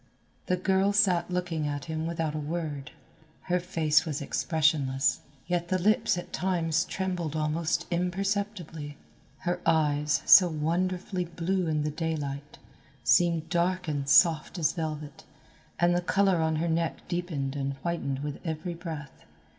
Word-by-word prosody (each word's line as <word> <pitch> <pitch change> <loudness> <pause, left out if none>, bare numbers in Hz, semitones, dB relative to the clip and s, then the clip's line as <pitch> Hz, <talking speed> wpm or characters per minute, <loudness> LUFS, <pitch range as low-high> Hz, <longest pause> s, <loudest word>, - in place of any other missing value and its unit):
The 180 - +1
girl 190 +2 +2
sat 185 -4 +3
looking 175 -4 -2
at 145 -2 -4
him 160 0 -3
without 165 -2 -2
a 155 - -3
word. 150 -2 -4 0.5
Her 180 0 0
face 165 -4 +2
was 155 -5 -3
expressionless, 145 -3 +1 0.3
yet 175 -1 -1
the 185 - +1
lips 215 +2 +2
at 175 0 -7
times 170 -4 0
trembled 180 -5 -3
almost 155 +1 0
imperceptibly. 180 -4 -2 0.4
Her 175 0 -2
eyes, 150 -2 +2
so 180 -3 +8
wonderfully 180 +4 -1
blue 180 +1 -1
in 155 -1 0
the 150 - -1
daylight, 150 -3 -4 0.5
seemed 170 -2 +3
dark 180 +1 0
and 140 -2 -2
soft 160 +4 +4
as 160 -2 +1
velvet, 155 -3 -5 0.5
and 175 0 +3
the 175 - +1
colour 195 +1 +2
on 160 0 +1
her 165 +2 0
neck 165 0 -1
deepened 165 -6 -3
and 140 -1 -2
whitened 145 -5 -2
with 145 -1 -4
every 165 +2 -3
breath. 160 -5 -8
165 Hz, 145 wpm, -28 LUFS, 150-180 Hz, 0.5 s, so